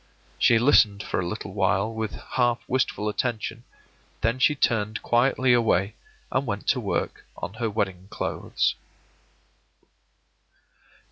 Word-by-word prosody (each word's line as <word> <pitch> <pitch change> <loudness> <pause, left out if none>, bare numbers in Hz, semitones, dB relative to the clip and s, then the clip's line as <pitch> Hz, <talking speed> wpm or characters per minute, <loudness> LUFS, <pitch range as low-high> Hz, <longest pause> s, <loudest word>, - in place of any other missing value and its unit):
She 120 - +5
listened 110 -5 +4
for - - -2
a 90 - -2
little 100 +1 -5
while 100 +2 +1
with 110 -1 -3 0.2
half 120 -2 +1
wistful 125 -4 0
attention; 115 +2 -3 0.6
then 115 +3 +1
she 150 +3 +4
turned 110 -4 0
quietly 125 +1 +3
away 110 -4 +2 0.4
and 130 0 0
went 100 -1 -3
to - - +3
work - - -2
on - - -5
her 115 - +1
wedding 95 -3 -2
clothes. - - -1
110 Hz, 125 wpm, -25 LUFS, 100-120 Hz, 0.6 s, She